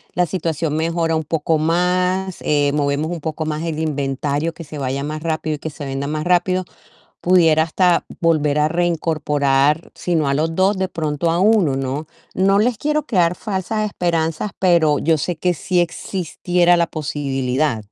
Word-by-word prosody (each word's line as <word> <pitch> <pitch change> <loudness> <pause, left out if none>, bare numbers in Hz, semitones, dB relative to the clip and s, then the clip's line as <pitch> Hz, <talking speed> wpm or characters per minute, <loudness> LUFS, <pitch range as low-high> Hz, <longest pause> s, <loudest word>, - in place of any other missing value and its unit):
la 180 - +3
situación 160 -3 -2
mejora 165 0 0
un 160 - -1
poco 160 +1 0
más, 180 +3 0
eh, 145 -1 +2
movemos 145 +2 0
un 170 -3 -5
poco 155 0 -3
más 155 +1 -3
el 165 -2 -3
inventario, 145 +1 -1
que 165 - -9
se 150 0 -8
vaya 135 +1 -2
más 155 +1 -4
rápido 160 -1 -1
y - - -24
que 160 - -5
se 145 - -8
venda 135 +1 -3
más 155 +1 -2
rápido, 180 +1 +2 0.6
pudiera 165 -3 +4
hasta 175 +2 +2 0.2
volver 150 -3 +2
a 150 - +2
reincorporar, 155 -3 +1
si 175 -1 -2
no 150 -3 +1
a 140 - +1
los 160 +2 -1
2 190 +1 +2
de 190 0 0
pronto 160 -2 -1
a 170 - 0
1, 195 -8 +3
¿no? 135 +3 -3 0.3
No 195 +1 +3
les 235 0 +1
quiero 300 +2 -1
crear 180 - +2
falsas 215 +2 -2
esperanzas, 170 0 -1
pero 170 -5 +3
yo 160 +1 +2
sé 175 +4 -2
que 180 +2 +1
sí 175 +3 -1
existiera 175 0 0
la 170 -1 +2
posibilidad. 140 -4 -1
160 Hz, 180 wpm, -20 LUFS, 150-180 Hz, 0.6 s, pudiera